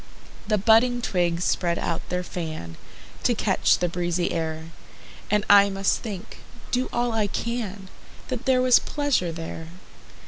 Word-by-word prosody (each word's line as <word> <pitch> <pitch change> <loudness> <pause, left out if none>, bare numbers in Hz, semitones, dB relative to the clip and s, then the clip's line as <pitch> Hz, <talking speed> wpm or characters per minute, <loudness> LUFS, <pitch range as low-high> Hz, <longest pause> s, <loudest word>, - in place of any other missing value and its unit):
The 215 - +2
budding 230 +4 +4
twigs 175 -6 0
spread 170 -1 0
out 165 - -2
their 180 0 -1
fan, 155 - -6 0.5
To - - +2
catch - - +2
the 180 - 0
breezy 175 0 -1
air; 160 0 -4 0.6
And 210 0 +1
I 200 0 +7
must 195 0 0
think, 210 -2 -7 0.3
do 255 +1 0
all 240 0 0
I 220 -2 +1
can, 210 -3 -4 0.4
That 250 -3 -4
there 255 -1 +3
was 255 -1 +6
pleasure 285 - -1
there. 165 0 -7
195 Hz, 145 wpm, -24 LUFS, 170-235 Hz, 0.6 s, I